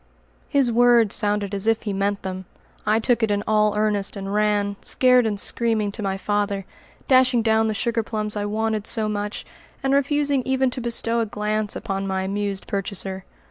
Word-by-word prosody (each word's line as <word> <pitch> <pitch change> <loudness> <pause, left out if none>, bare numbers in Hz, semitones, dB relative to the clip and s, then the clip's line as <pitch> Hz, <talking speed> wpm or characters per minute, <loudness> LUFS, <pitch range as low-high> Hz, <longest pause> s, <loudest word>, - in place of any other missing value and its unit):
His 275 -4 +2
words 235 -2 +4
sounded 205 -1 0
as 200 +2 0
if 225 0 +2
he 205 -3 -3
meant 200 +1 -1
them. 185 0 -5 0.4
I 215 +1 +4
took 235 +1 +1
it 225 - +2 0.2
all 210 -1 +2
in - - 0
earnest, 210 -2 0
and 195 0 -5
ran, 205 -1 +1
scared 250 -2 +4
and 205 -2 -2
screaming, 220 -2 0
to 215 - -7
my 195 -1 -2
father, 205 -1 -1 0.4
dashing 255 -3 +4
down 220 0 +3
the 215 - -1
sugar 230 +1 0
plums 215 -1 -3
I 205 0 -2
wanted 215 0 -1
so 220 -2 0
much, 205 0 -4 0.4
and 270 0 +1
refusing 280 0 +2
even 265 0 +1
to 250 - -4
bestow 235 0 0
a 225 - 0
glance 210 0 -2
upon 195 -3 -3
my 190 0 -1
amused 200 0 -2
purchaser. 195 -1 -4
215 Hz, 185 wpm, -23 LUFS, 200-230 Hz, 0.4 s, words